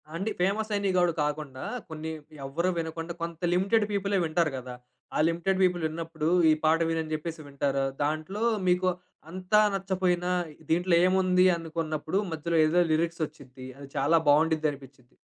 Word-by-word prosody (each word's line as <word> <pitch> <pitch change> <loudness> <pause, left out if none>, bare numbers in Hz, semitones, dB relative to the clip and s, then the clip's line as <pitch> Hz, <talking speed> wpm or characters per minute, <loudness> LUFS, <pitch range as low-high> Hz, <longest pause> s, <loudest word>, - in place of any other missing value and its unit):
అండి, 195 +6 -2
ఫేమస్ 210 +4 0
అయినవి 200 -2 0
గూడ 175 -1 +4
కాకుండా, 150 -3 -4 0.3
కొన్ని 160 0 -5 0.3
ఎవ్వరు 165 +7 -1
వినకుండా 165 +1 -4
కొంత 170 -1 -4
లిమిటెడ్ 200 +4 +2
పీపులే 200 0 0
వింటారు 160 0 +1
గదా! 125 -1 -7 0.4
ఆ - - +1
లిమిటెడ్ 175 +3 0
పీపుల్ 180 -2 +2
విన్నప్పుడు 160 -1 -4 0.2
"ఈ - - +6
పాట 160 +1 +4
విను" 165 0 0
అని 155 0 -6
చెప్పేసి 165 +1 -6
వింటారు. 140 -1 -1 0.2
దాంట్లో 155 +8 -2 0.2
మీకు 180 +1 +3 0.4
అంతా 185 +4 +2
నచ్చపోయినా 185 -2 0 0.4
దీంట్లో 175 +2 +3
ఏముంది? 185 -1 +3
అనుకున్నప్పుడు 160 +1 -3
మధ్యలో 165 +1 -1
ఏదో 165 +3 +2
లిరిక్స్ 165 +1 0
ఒచ్చుద్ది. 130 -4 -13
అది 140 -1 -10
చాలా 165 +3 +3
బావుండ్డిద్ది 155 +1 +4
అనిపిచ్చిద్ది. 135 -2 -14
165 Hz, 150 wpm, -27 LUFS, 155-185 Hz, 0.4 s, ఈ